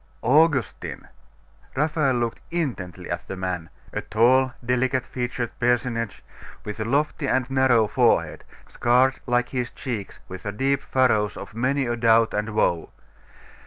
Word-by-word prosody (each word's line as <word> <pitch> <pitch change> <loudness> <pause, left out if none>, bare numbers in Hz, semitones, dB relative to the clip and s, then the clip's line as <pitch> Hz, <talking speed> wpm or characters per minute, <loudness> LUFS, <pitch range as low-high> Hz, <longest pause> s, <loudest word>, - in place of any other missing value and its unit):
Augustine! 145 0 +1 0.7
Raphael 150 -2 +1
looked 120 -1 -1
intently 125 - -3
at - - -4
the 95 - -5
man, 90 -3 -4 0.2
a - - -2
tall, 130 +4 +3
delicate 125 +1 +1
featured 120 -1 -3
personage, 120 -2 0 0.4
with 105 +1 -6
a 110 - -2
lofty 145 +3 0
and 130 -2 +1
narrow 130 -5 +4
forehead, - - +2 0.2
scarred 125 +2 +2
like 125 0 +1
his 125 -2 -2
cheeks 115 -7 -6
with 95 0 -8
the 100 - -4
deep 135 +6 0
furrows 110 -6 +1
of 100 +1 -9
many 130 +4 0
a 120 0 -1
doubt 115 -1 +4
and 105 +1 -1
woe. 85 -5 +1
120 Hz, 140 wpm, -24 LUFS, 110-130 Hz, 0.7 s, narrow